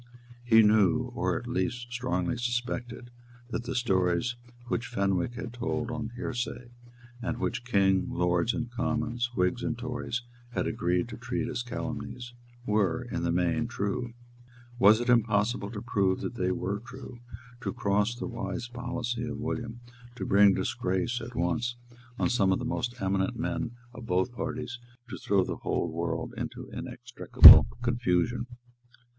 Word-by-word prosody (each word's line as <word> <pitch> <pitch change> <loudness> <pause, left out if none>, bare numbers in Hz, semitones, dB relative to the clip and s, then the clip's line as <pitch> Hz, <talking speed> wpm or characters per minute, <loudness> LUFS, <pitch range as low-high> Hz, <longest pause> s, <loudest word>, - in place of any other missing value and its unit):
He 115 -2 +6
knew, 105 -4 +3
or - - 0
at - - -7
least 120 +6 -2
strongly 120 -7 -1
suspected, 120 0 -3 0.4
that 120 - -3
the 125 - -4
stories 95 -1 +1 0.3
which 120 0 -2
Fenwick 100 -1 0
had 120 -1 -6
told 120 0 -2
on 115 -2 -4
hearsay, 120 0 -4 0.5
and 120 0 -2
which 120 -1 -2
King, 95 -5 +2
Lords 90 +4 +1
and 120 -1 -4
Commons, 120 0 -1
Whigs 90 +6 +1
and 120 -1 -2
Tories, 125 0 -4 0.3
had - - -1
agreed 90 +4 0
to - - -7
treat 120 0 -3
as 125 -2 -3
calumnies, 120 0 -6 0.3
were, 105 +2 +1
in - - -2
the 85 0 0
main, 90 +7 +1
true. 120 +2 -3 0.6
Was 105 +3 +7
it 120 - -3
impossible 110 -2 +2
to 105 -2 -7
prove 95 -2 +1
that - - -4
they 90 -6 -1
were 95 +2 -2
true, 125 +1 -11 0.4
to 100 - -2
cross 105 +4 0
the 120 - -5
wise 115 -1 -4
policy 120 -1 -4
of 115 -1 -5
William, 120 0 -4 0.3
to - - -4
bring 100 0 +5
disgrace 115 +7 -1
at 115 +1 -8
once 115 +8 0 0.4
on - - +1
some 100 -6 +2
of 95 - +3
the 125 - -5
most 120 0 -3
eminent 95 +4 0
men 120 0 -2 0.2
of 120 -2 -9
both 95 +6 +1
parties, 120 0 -4 0.3
to - - -6
throw 100 -2 +2
the - - -4
whole - - -1
political - - -7
world - - -3
into - - -6
inextricable - - +8 0.2
confusion? 120 0 0
115 Hz, 155 wpm, -28 LUFS, 100-120 Hz, 0.6 s, inextricable